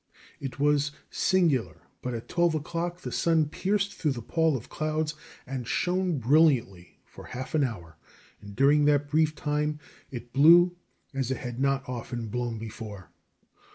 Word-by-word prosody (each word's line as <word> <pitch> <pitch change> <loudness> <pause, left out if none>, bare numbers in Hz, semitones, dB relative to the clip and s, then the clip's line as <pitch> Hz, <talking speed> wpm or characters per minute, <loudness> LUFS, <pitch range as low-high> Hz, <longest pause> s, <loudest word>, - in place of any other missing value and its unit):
It 135 0 -6
was 145 0 +2 0.2
singular, 165 -10 +1 0.2
but 125 -1 -3
at 115 - -7
twelve 170 -2 +2
o'clock 170 +3 -3
the - - -5
sun 160 -3 +2
pierced 200 +4 0
through 150 -4 -1
the 120 -3 -7
pall 160 +1 +1
of 115 - -11
clouds 155 0 -2 0.3
and 130 -3 -5
shone 180 +4 0
brilliantly 125 - +2
for - - -13
half 130 +1 -7
an 155 -2 +3
hour, 85 - -5 0.4
and 100 -1 -11
during 145 +4 +4
that 145 -1 +3
brief 155 0 +2
time 150 0 -1 0.3
it 120 -2 -8
blew 175 +5 +7 0.4
as 135 -2 -2
it 130 - -1
had 120 -1 -6
not 135 -1 +1
often 120 -2 -5
blown 120 0 -2
before. 110 -4 -8
140 Hz, 155 wpm, -27 LUFS, 120-155 Hz, 0.4 s, blew